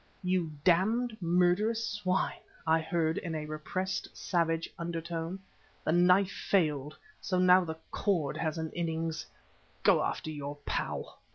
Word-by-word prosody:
"You 180 -3 +1
damned 220 +7 +3
murderous 180 +6 +2
swine!" 190 -3 -1 0.3
I 160 0 +4
heard 160 0 0
in 165 -2 -4
a 155 -1 -3
repressed, 175 +5 -3
savage 165 -2 0
undertone. 170 +1 -3 0.5
"The - - +1
knife 180 +3 +5
failed, 150 -6 0 0.2
so 185 - -1
now 180 0 +6
the 160 -2 -5
cord 170 -9 0
has 160 0 -1
an 160 -1 -3
innings! 165 -1 -2 0.6
Go - - +5
after 155 - -2
your 145 -1 -5
pal!" - - -3
170 Hz, 130 wpm, -31 LUFS, 160-185 Hz, 0.6 s, now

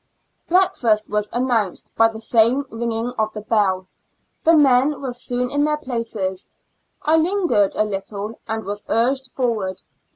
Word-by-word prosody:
Breakfast 240 - +2
was 210 0 0
announced 235 -6 -1
by 225 - +5
the 225 -1 -7
same 230 +4 +3
rino'ino^ 230 +1 -2
of 215 0 +1
the 210 - -6
bell. 200 -4 +1 0.6
The 330 +1 +5
men 275 0 +4
were 265 -3 -4
soon 245 0 -2
in 285 0 +1
their 300 0 +1
places; 225 -9 -3 0.5
I 315 +2 +4
lingered 330 - +2
a. - - +2
little, 205 +1 -5
" - - -44
and 220 0 -3
was 205 +1 -5
urged 255 +3 +1
forward. 215 -7 -2
230 Hz, 155 wpm, -21 LUFS, 210-265 Hz, 0.6 s, by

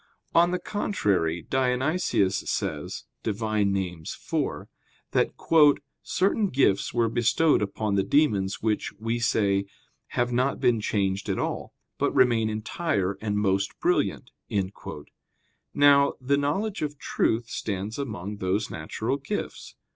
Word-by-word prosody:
On 170 +1 +5
the 180 - 0
contrary, 100 - -1
Dionysius 130 - +1
says - - -3 0.2
(Div. 105 -2 -3
Nom. 105 -3 +1
iv) 90 -4 -3 0.4
that, - - +2 0.7
"certain 200 +2 +1
gifts 130 - +2
were 120 -1 +2
bestowed 120 +7 +3
upon 105 +1 -2
the 100 - +3
demons 100 -7 +1
which, 110 -2 0
we 115 +2 -2
say, 100 -4 +2 0.5
have 120 0 +1
not 130 +3 +1
been 120 -4 +2
changed 100 -2 -1
at - - 0
all, - - -3 0.2
but - - +2
remain 115 -3 +4
entire 110 - -1
and 105 -1 -1
most 100 -1 0
brilliant." - - 0 1.4
Now, 140 -1 +5
the 135 +2 +1
knowledge 190 +10 -1
of 150 -1 -3
truth 115 -2 0
stands 105 +4 -4
among 105 -6 -4
those 100 +2 -1
natural 110 - -3
gifts. 175 +9 -5
110 Hz, 125 wpm, -26 LUFS, 100-140 Hz, 1.4 s, On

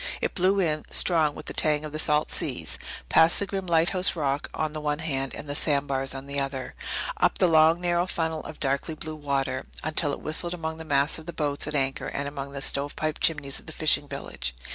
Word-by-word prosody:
It - - -1
blew 190 +2 +2
in, 155 -4 +1
strong 160 -4 +3
with - - -9
the - - -6
tang 150 0 +1
of 150 - -6
the 155 - -3
salt 150 0 +2
seas, - - -1 0.3
past 160 +1 +5
the 200 - +2
grim 195 -1 -4
lighthouse 175 +3 +2
rock 145 -3 -1
on 155 -1 -2
the 155 - -4
one 150 -1 0
hand 135 -4 -2
and 145 - -8
the 145 - -3
sandbars 140 -3 +2
on 135 0 -6
the 140 0 -2
other, 135 -1 -3 0.4
up - - +3
the - - +4
long, 160 +1 +5
narrow 175 0 +1
funnel 160 -3 -2
of 155 - -9
darkly 140 +3 -1
blue 155 0 -6
water, 135 -3 -2 0.2
until 155 -1 +1
it - - -4
whistled 170 +3 +1
among 160 -2 -4
the 160 - -7
masts 145 +1 +1
of 160 - -13
the 170 - -5
boats 145 -1 -1
at 150 - -3
anchor 135 -1 0
and 140 +1 -3
among 140 -1 -6
the 140 -1 -4
stovepipe 145 +3 0
chimneys 145 -4 0
of - - -19
the - - -8
fishing - - +3
village. - - -5
150 Hz, 225 wpm, -26 LUFS, 140-160 Hz, 0.4 s, past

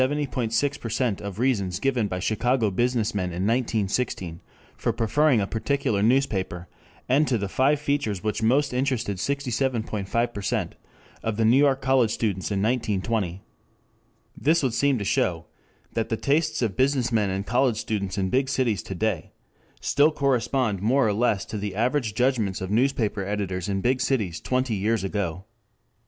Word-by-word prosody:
6% 130 -4 -1
of 100 -2 -6
reasons 100 -8 0
given 125 -3 +1
by 90 - -3
Chicago 110 +3 +1
business 120 +1 0
men 100 -3 -1
in 90 +1 -3
1916 110 -6 -1 0.4
for - - -1
preferring 120 +4 +2
a 100 - +1
particular 115 0 -1
newspaper, 100 -7 +1 0.4
and 145 +4 +3
to 125 - +1
the 100 -1 -2
five 135 +8 +2
features 140 -10 -1
which 105 +1 -1
most 135 +5 +2
interested 125 -6 -1
67.5% 120 -4 -1 0.5
of 110 -2 -2
the 115 - +2
New 115 +4 +5
York 140 -1 +3
College 130 -4 +3
students 100 -4 -1
in 100 -1 0
1920. 105 -5 -1 0.9
This 160 +2 +2
would 130 -4 +1
seem 140 +1 +2
to 100 - -3
show 85 -3 0 0.5
that 115 -1 -1
the 110 - 0
tastes 155 +1 +1
of 105 -5 -1
business 130 -1 +1
men 105 -4 +2
and 95 +1 -2
college 125 -1 +2
students 100 -3 -3
in 95 -1 -1
big 130 +1 +1
cities 120 -8 0
to 95 - -7
day 100 -3 -1 0.5
still 145 +3 +3
correspond 130 -7 0
more 120 +4 +3
or 105 - +1
less 110 -2 +1
to 105 - -5
the 100 -2 -4
averaged 120 -1 0
judgments 120 -7 +1
of 95 +1 -5
newspaper 115 -4 +1
editors 95 -2 -3
in 95 -1 -1
big 125 +3 +1
cities 105 -11 -1
twenty 130 -2 0
years 105 +1 0
ago. 95 -2 -3
115 Hz, 160 wpm, -25 LUFS, 100-130 Hz, 0.9 s, New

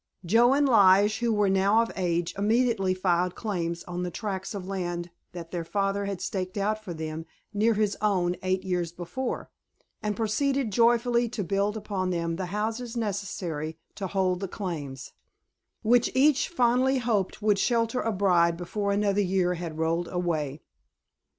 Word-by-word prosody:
Joe 235 +8 +5
and 285 0 +3
Lige, 205 -1 +5
who 235 -1 +1
were 210 -2 +2
now 195 +4 +4
of 230 - -5
age, 175 -2 -1
immediately 210 -2 +2
filed 180 -1 +1
claims 170 -5 -3
on 180 0 -5
the 180 - -2
tracts 190 +1 -4
of 190 -2 -5
land 175 -3 -4 0.2
that 170 -2 -8
their 175 -2 -3
father 200 +3 -1
had 195 -2 -4
staked 185 0 -3
out 215 +2 -1
for 185 - -6
them 160 0 -5 0.3
near 220 +2 +2
his 210 -1 +1
own 185 -4 +1
eight 185 0 0
years 180 -3 -1
before, 175 +10 -5 0.5
and 210 -1 -1
proceeded 240 +3 0
joyfully 235 +2 +3
to 220 -3 -3
build 200 +4 0
upon 200 -3 -2
them 170 -2 -1
the 185 -1 -3
houses 225 +5 -3
necessary 180 -7 -3 0.2
to 195 - -4
hold 185 -1 0
the 195 - -3
claims, 150 - -5 0.7
which 235 +2 +4
each 290 +2 +4
fondly 255 -3 +2
hoped 220 -5 -1
would 210 -2 +3
shelter 230 +1 +1
a 225 - 0
bride 175 -4 +3
before 200 +3 -2
another 200 0 +2
year 185 -2 +1
had 170 -3 -6
rolled 165 +2 0
away. 155 -5 -2
195 Hz, 165 wpm, -27 LUFS, 175-220 Hz, 0.7 s, Joe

